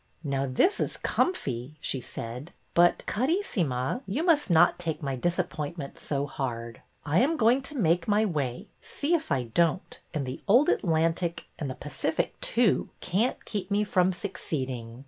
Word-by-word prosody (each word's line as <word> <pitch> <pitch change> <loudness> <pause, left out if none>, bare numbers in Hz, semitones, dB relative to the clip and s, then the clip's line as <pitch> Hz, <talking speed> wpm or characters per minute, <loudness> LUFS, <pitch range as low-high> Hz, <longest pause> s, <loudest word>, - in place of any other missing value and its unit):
''Now 135 -1 -1
this 365 - +3
is - - -2
comfy," 135 - -1
she 135 -3 -1
said; 125 +8 -7 0.2
"but, 175 0 +4
Caris 325 - 0
sima, 135 - 0
you 225 +12 -1
must 320 - +3
not 175 +1 +5
take 165 -3 -3
my 135 -1 -1
disappointment 170 -1 -3
so 140 -1 -2
hard. 115 -4 -5 0.2
I 150 +4 +3
am 305 +6 +2
going 240 +2 +4
to 285 +2 -7
make 170 -5 +2
my 210 +1 +3
way, 140 - -2
see 295 +4 -2
if 325 - 0
I 135 -3 +2
don't, 165 - 0
and 150 -4 -2
the 130 - -6
old 245 +9 +6
Atlantic, 165 0 +1
and 145 - -3
the 130 - -5
Pacific, 145 +2 -2
too, 230 -4 +2
can't 220 +8 0
keep 205 -2 -3
me 205 +1 +2
from 185 -2 +2
succeeding." 130 - -4
170 Hz, 165 wpm, -28 LUFS, 135-210 Hz, 0.2 s, old